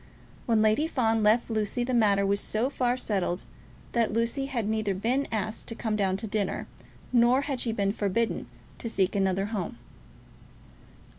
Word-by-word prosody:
When 225 -2 +3
Lady 220 +9 +3
Fawn 225 -7 +1
left 220 +3 +3
Lucy 220 +2 0
the 255 +1 -2
matter 205 -4 +3
was 200 +1 +2
so 230 +7 0
far 250 -2 0
settled 190 -6 -2 0.5
that 235 -2 +1
Lucy 230 +5 0
had 240 -6 -2
neither 215 -2 0
been 245 +8 0
asked 215 0 -2
to 230 - -3
come 220 -2 -2
down 190 -2 +1
to 220 - -5
dinner, 205 -2 -2 0.5
nor 245 +2 +5
had 280 -3 -3
she 230 - 0
been 200 -2 0
forbidden 220 +2 -1 0.3
to 230 - -3
seek 195 -4 +1
another 195 0 +1
home. 180 - -3
220 Hz, 165 wpm, -28 LUFS, 200-240 Hz, 0.5 s, nor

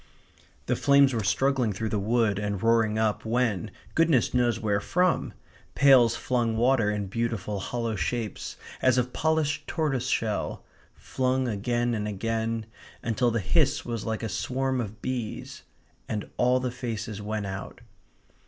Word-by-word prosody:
The - - +1
flames 140 -1 +5
were 115 -3 -1
struggling 130 +2 +1
through 110 +3 -3
the 105 - 0
wood 110 -1 +1
and 105 -2 -3
roaring 115 -1 +3
up 110 -1 0
when, 110 -4 0 0.2
goodness 160 -7 +3
knows 120 -2 +2
where 105 -3 +1
from, 180 - +1 0.4
pails 130 -5 +6
flung 120 -3 0
water 120 -2 +3
in 105 -1 -1
beautiful 105 -1 -2
hollow 115 +2 -2
shapes, 115 +2 -3 0.2
as 130 -1 +4
of 125 0 0
polished 160 -1 0
tortoiseshell; 130 -8 -1 0.3
flung 130 0 -1
again 120 +3 0
and 105 -2 -2
again; 115 +2 -2 0.4
until 120 +1 +1
the 115 0 0
hiss 145 - +1
was 115 -3 -3
like 110 -1 -3
a - - -1
swarm 130 +6 -1
of 110 0 -7
bees; 125 -4 -4 0.5
and 105 -2 -3
all 125 +1 +3
the 125 -1 -2
faces 115 -4 -5
went 105 0 -3
out. 95 0 -6
115 Hz, 145 wpm, -27 LUFS, 105-130 Hz, 0.5 s, pails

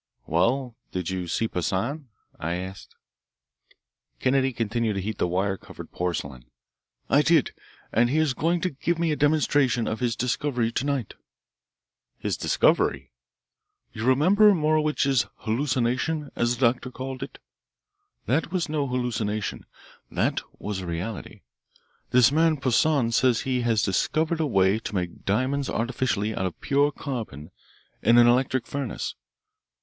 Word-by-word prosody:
"Well, 120 - +1 0.2
did 90 -1 -3
you 90 -2 -3
see 115 +6 0
Poissan?" 115 - -2 0.3
I 85 +2 -2
asked. 95 +2 -8 1.2
Kennedy 135 0 +2
continued 115 -1 -1
to 100 - -2
heat 105 +2 -4
the - - +2
wire 95 +2 0
covered - - -11
porcelain. 75 -8 -4 0.6
"I 140 - +4
did, 160 -2 +3 0.4
and 120 +1 +3
he 145 - +1
is 155 -4 +2
going 170 +5 0
to 185 - 0
give 160 +4 -1
me 165 -1 +1
a - - +1
demonstration 145 -5 +2
of 110 - -2
his 120 -3 0
discovery 125 -1 -1
to 130 +4 -2
night." 140 -6 -2 1.0
"His - - -2
discovery!" - - +1 0.8
"You 110 - -5
remember 190 +11 +5
Morowitch's 150 -4 +2
'hallucination,' 130 +5 -1
as 120 +1 +1
the 130 - +3
doctor 130 0 -10
called 130 +1 -6
it? 135 - -7 0.9
That 160 +5 0
was 180 -2 0
no 150 -2 -1
hallucination; 115 -5 -2 0.4
that - - 0 0.2
was 105 -2 -4
a 90 - -6
reality. 90 +5 -5 0.7
This 125 0 +5
man 160 +1 +3
Poissan 135 -1 +2
says 120 0 +3
he 130 -1 -1
has 115 -3 +1
discovered 155 - 0
a 155 - +1
way 95 -3 +3
to 110 - -6
make 90 -2 -4
diamonds 130 +7 0
artificially 115 -3 -1
out 95 - -1
of 90 - -8
pure 145 +1 +2
carbon 115 - -6 0.5
in 115 +2 +5
an 120 - +8
electric 125 0 +2
furnace. 140 -5 -4
125 Hz, 145 wpm, -25 LUFS, 105-145 Hz, 1.2 s, an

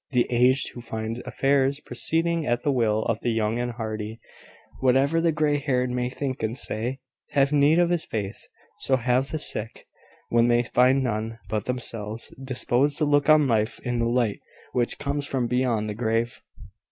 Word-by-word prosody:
The 125 -1 +3
aged 125 +2 +3
who 120 - -9
find 110 0 -5
affairs 140 0 +1
proceeding 165 +6 0
at 120 0 0
the 145 - +2
will 110 -4 +1
of 115 -1 -1
the - - -1
young 110 0 0
and 120 0 -2
hardy, 110 -1 -5 0.6
whatever 135 +5 +3
the 165 0 +3
grey 150 -1 +1
haired 125 -3 0
may 125 0 -1
think 130 0 -4
and 110 +3 -2
say, 120 +1 -3 0.4
have 140 0 +3
need 145 +2 +4
of 175 -1 +3
this 175 -2 0
faith. 100 -3 -5 0.3
So 130 - +2
have 125 +2 +1
the 155 - -2
sick, 115 -7 -1 0.4
when 120 0 +3
they 120 0 +3
find 130 +2 +3
none 115 -1 -2
but 105 -1 -2
themselves 115 -3 -3
disposed 130 +2 +1
to 155 - +1
look 145 0 +2
on 155 -2 +6
life 110 0 0
in 120 -2 -2
the 115 - +1
light 120 -4 0 0.3
which 120 -1 0
comes 145 0 -2
from 130 -4 -1
beyond 120 -3 0
the 105 - -3
grave. 115 +1 -1
125 Hz, 180 wpm, -25 LUFS, 115-140 Hz, 0.6 s, on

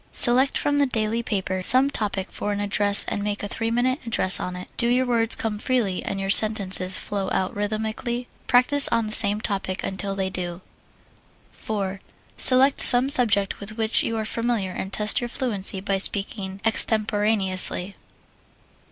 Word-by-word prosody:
Select 255 +3 +3
from 290 0 -1
the 285 - +2
daily 225 -1 -2
paper 190 -4 -4
some 260 +8 +2
topic 200 -6 -3
for 205 - -5
an 205 - -4
address 205 0 +5
and 205 - -4
make 205 0 -4
a - - -3
three 225 +2 -4
minute 250 +4 -1
address 220 -5 +3
on 180 - -6
it. 180 - -9
Do 235 - 0
your 250 +2 +1
words 230 -2 +2
come 215 -2 -5
freely 225 -7 -2
and 195 - -5
your 195 0 -2
sentences 195 -4 +2
flow 195 -2 -4
out 185 - -3
rhythmically? 220 +4 -4 0.2
Practise 270 +3 +3
on 230 -1 -1
the 215 - -7
same 205 0 +3
topic 195 -3 -3
until 195 +1 -4
they 190 -1 -4
do. 175 -1 -6 0.9
4. 195 -3 -6 0.4
Select 265 +2 +5
some 250 +2 +6
subject 205 -8 +1
with 215 +2 -8
which 220 0 +1
you 230 - -4
are 220 - -4
familiar 230 -4 -3
and 190 +1 -7
test 210 +4 0
your 240 - -4
fluency 215 -7 -1
by 195 0 -2
speaking 195 -1 -2
extemporaneously. 210 -4 +1
210 Hz, 170 wpm, -22 LUFS, 195-235 Hz, 0.9 s, some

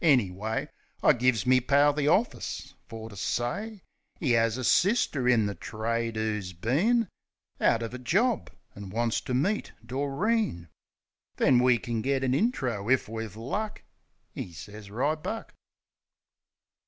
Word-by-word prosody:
Anyway, 110 - +2 0.4
I - - +7
gives 120 -4 +2
me 130 0 +5
pal 145 +3 +4
the 145 0 0
orfis 215 +10 0
fer 110 0 -7
to 105 - -12
say 190 - -3 0.4
'E 130 -7 +2
'as 115 0 +2
a 130 - -4
sister 155 - +3
in 115 -4 +4
the 100 - -2
trade 115 +4 -3
'oo's 105 -4 -2
been 180 - +2 0.5
Out 115 - +3
uv 115 +1 -4
a 125 - -5
jorb, 215 - +1 0.3
an' 100 -1 -8
wants 115 +3 0
ter 125 - -3
meet 195 +12 0
Doreen; 140 - -1 0.7
Then 125 - +4
we 125 -1 +5
kin 115 -1 -3
get 135 +2 0
an 130 -1 +1
intro, 130 - 0
if 130 0 +3
we've 110 -2 -5
luck. 205 - -4 0.5
'E 90 - -6
sez, 100 +5 -10
"Ribuck." 155 - -2
125 Hz, 140 wpm, -28 LUFS, 110-150 Hz, 0.7 s, I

